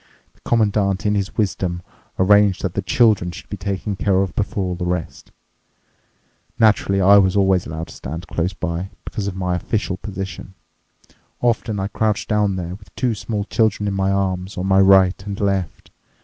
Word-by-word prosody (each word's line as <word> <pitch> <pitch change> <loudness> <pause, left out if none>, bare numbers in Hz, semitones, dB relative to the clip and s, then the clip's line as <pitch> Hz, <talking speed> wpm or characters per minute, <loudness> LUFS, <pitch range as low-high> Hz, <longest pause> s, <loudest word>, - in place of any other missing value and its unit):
The - - -30
Commandant, 105 -2 +1
in 105 - +2
his 100 -1 -2
wisdom, 90 -4 -1 0.3
arranged 100 0 +4
that 95 -3 -1
the 100 - -1
children 100 -2 +3
should 85 - -10
be - - -2
taken 100 +1 -3
care 95 0 +2
of 95 -4 -5
before 100 -1 -1
all 90 -1 -2
the 90 +1 -5
rest. 90 -2 -4 1.3
Naturally, 105 -3 +3
I 100 +2 +7
was 95 0 +2
always 95 -2 +2
allowed 80 +1 -6
to - - -10
stand 80 +7 -7
close 90 +3 -2
by, 90 +1 -4 0.2
because 100 -2 -4
of 95 - -4
my 90 -1 -1
official 95 +1 -2
position. 95 -2 -7 0.8
Often 115 -3 0
I 95 - -1
crouched 105 0 -1
down 105 -2 +1
there 90 -1 -4
with 100 -1 -13
two 125 -3 0
small 105 0 -3
children 105 -1 0
in 100 - -1
my 95 0 0
arms, 95 0 -2
on 90 - -2
my 95 0 +4
right 95 -1 +5
and 100 0 -5
left. 95 -5 -2
95 Hz, 180 wpm, -20 LUFS, 90-105 Hz, 1.3 s, I